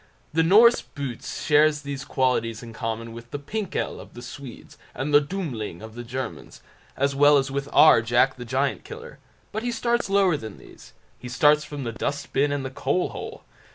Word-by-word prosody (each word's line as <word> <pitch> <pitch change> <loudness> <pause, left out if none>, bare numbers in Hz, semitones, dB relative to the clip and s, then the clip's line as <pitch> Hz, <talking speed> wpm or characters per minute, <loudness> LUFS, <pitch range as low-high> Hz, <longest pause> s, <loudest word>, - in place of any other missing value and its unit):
The 165 - +3
Norse 215 +8 +6
"Boots" 135 -5 -6
shares 150 0 +4
these 140 -1 -5
qualities 120 -3 0
in 115 -1 -9
common 115 0 -4
with 115 +1 -11
the 145 - -4
"Pinkel" 195 +7 -4
of - - -13
the 120 - -9
Swedes, 130 -1 -10 0.2
and 145 +2 -3
the 145 - +7
Dummling 135 - -5
of 110 0 -9
the 120 +1 -7
Germans, 130 +2 -7 0.3
as 140 +1 +1
well 145 +1 +6
as 135 0 0
with 140 +1 -3
our 155 -7 +7
"Jack 120 +4 +2
the 125 - -7
Giant 135 +3 -1
Killer", 465 +1 -10 0.3
but 215 - -3
he 245 +1 -2
starts 235 -1 0
lower 195 -5 +3
than 110 -5 -8
these—he 125 - -14
starts 150 +4 +4
from 145 -2 -6
the 115 - -3
dust 140 +5 -4
bin 145 +1 +2
and 140 -2 -2
the 130 - -5
coal 140 +7 -1
hole. - - -8
140 Hz, 190 wpm, -24 LUFS, 120-150 Hz, 0.3 s, the